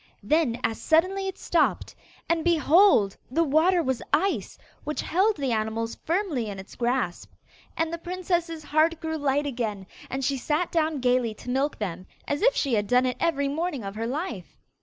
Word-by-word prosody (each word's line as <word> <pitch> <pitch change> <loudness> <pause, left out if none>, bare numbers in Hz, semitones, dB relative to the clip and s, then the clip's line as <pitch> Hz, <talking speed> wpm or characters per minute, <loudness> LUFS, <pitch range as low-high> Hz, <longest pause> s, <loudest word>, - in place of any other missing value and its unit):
Then 295 -7 +1
as 225 - -1
suddenly 375 +5 +2
it 385 - -5
stopped, - - 0 0.3
and, 335 -1 +1
behold! 330 - +4
the 325 +7 +2
water 330 +4 +3
was 260 -3 -1
ice, 385 +7 0 0.3
which 300 - -3
held 390 +5 +2
the 275 -3 -1
animals 225 +1 -1
firmly 330 - -1
in 200 - -6
its 190 +1 -10
grasp. 240 -7 -1 0.5
And 325 0 0
the 335 - -3
princess's 345 -2 -2
heart 315 +2 +2
grew 320 0 -3
light 285 0 +1
again, 225 -8 -3 0.2
and 265 0 -2
she 275 0 0
sat 305 +7 -1
down 315 -4 0
gaily 245 -3 +1
to 245 - -7
milk 275 +3 0
them, 185 -3 -5 0.2
as 285 - -1
if - - +4
she 275 -4 0
had 205 -2 +1
done 250 +2 +3
it 250 -1 -1
every 280 -4 +1
morning 295 -2 -2
of 195 0 -5
her 225 +2 -3
life. 260 - -5
290 Hz, 180 wpm, -26 LUFS, 240-335 Hz, 0.5 s, behold